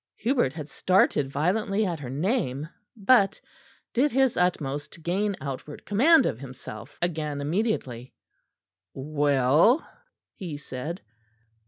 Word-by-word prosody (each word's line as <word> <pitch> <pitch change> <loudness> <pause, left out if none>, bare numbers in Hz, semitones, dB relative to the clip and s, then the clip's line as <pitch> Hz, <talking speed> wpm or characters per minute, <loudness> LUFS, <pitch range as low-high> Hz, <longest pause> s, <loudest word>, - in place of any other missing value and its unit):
Hubert 235 - +1
had 155 -3 -7
started 155 -6 +2
violently 195 +8 0
at 170 -4 -2
her 130 -4 -7
name; 150 - -1 0.3
but 200 -1 +4 0.5
did 270 +4 +2
his 265 -1 +2
utmost 150 -5 -1
to - - -12
gain 195 +5 -1
outward 140 +1 -7
command 270 +8 +5
of 115 - -2
himself 125 -6 -10
again 155 -4 -2
immediately. 145 - -2 0.8
"Well?" 145 - +3 0.5
he 175 -8 -6
said. 150 +5 -6
160 Hz, 115 wpm, -26 LUFS, 140-205 Hz, 0.8 s, command